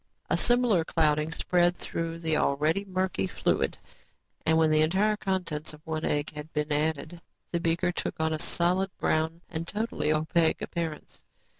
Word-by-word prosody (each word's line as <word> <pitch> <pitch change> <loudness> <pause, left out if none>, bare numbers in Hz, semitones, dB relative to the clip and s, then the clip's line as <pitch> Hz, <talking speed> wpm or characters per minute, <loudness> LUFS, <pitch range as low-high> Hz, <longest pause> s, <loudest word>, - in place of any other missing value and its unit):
A - - +5
similar 240 -8 +3
clouding 155 -1 +1
spread 175 +1 +2
through 165 0 -4
the 160 -2 0
already 155 +7 +1
murky 185 - -1
fluid - - 0 0.7
and 160 0 +4
when 160 -1 +4
the 155 0 +4
entire 195 +7 +3
contents 180 -7 -3
of 150 - -19
one 160 -1 -3
egg 145 +1 0
had 150 +1 -8
been 150 0 -1
added, 155 +2 -1 0.3
the 170 - 0
beaker 170 +2 +1
took - - -4
on 160 0 +1
a 155 - -2
solid, 180 +4 +1
brown 160 +2 0
and 165 0 -5
totally 210 -6 -1
opaque 160 +1 +2
appearance. 165 -3 -5
160 Hz, 160 wpm, -28 LUFS, 155-180 Hz, 0.7 s, A